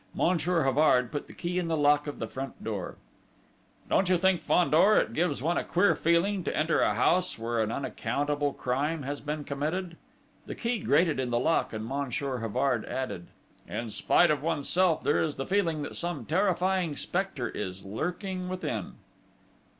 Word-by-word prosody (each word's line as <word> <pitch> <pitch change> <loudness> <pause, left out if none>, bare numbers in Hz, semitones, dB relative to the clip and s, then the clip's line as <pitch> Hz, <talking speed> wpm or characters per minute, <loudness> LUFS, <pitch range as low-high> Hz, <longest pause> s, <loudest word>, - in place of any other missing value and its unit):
Monsieur 170 -1 +1
Havard 130 -3 +3
put 145 - -4
the - - -12
key 180 +1 -2
in 175 - -2
the 165 -1 0
lock 145 0 +3
of 145 - -5
the - - -3
front 135 +4 -7
door. 100 -5 -4 0.9
"Don't 190 - +2
you 185 - +4
think, 190 -1 +2
Fandor, 180 +4 +4
it - - +1
gives 155 -5 0
one 170 +3 +1
a - - -3
queer 185 +4 +3
feeling 175 +4 +1
to - - -2
enter 155 +1 +2
a - - +2
house 180 +1 +2
where 115 +1 -2
an 110 0 -1
unaccountable 145 +3 -1
crime 140 +5 -2
has 145 +2 -4
been 150 0 -4
committed?" 165 +5 -3 0.5
The - - -5
key 235 -1 -1
grated 155 -2 +2
in 130 -2 -1
the 120 - +1
lock, 160 +7 +1
and 110 0 -5
Monsieur 135 0 -2
Havard 125 +4 0
added: 100 -10 -4 0.4
"In 115 -1 -4
spite 175 +9 +4
of 145 -3 0
oneself, 165 +2 +1
there 145 - +2
is 155 -2 -1
the 135 - -4
feeling 170 -6 0
that - - -6
some 170 -8 -3
terrifying 185 - +1
spectre 175 - -2
is 95 -1 -6
lurking 180 - -4
within!" 185 +1 -4
150 Hz, 175 wpm, -28 LUFS, 130-180 Hz, 0.9 s, you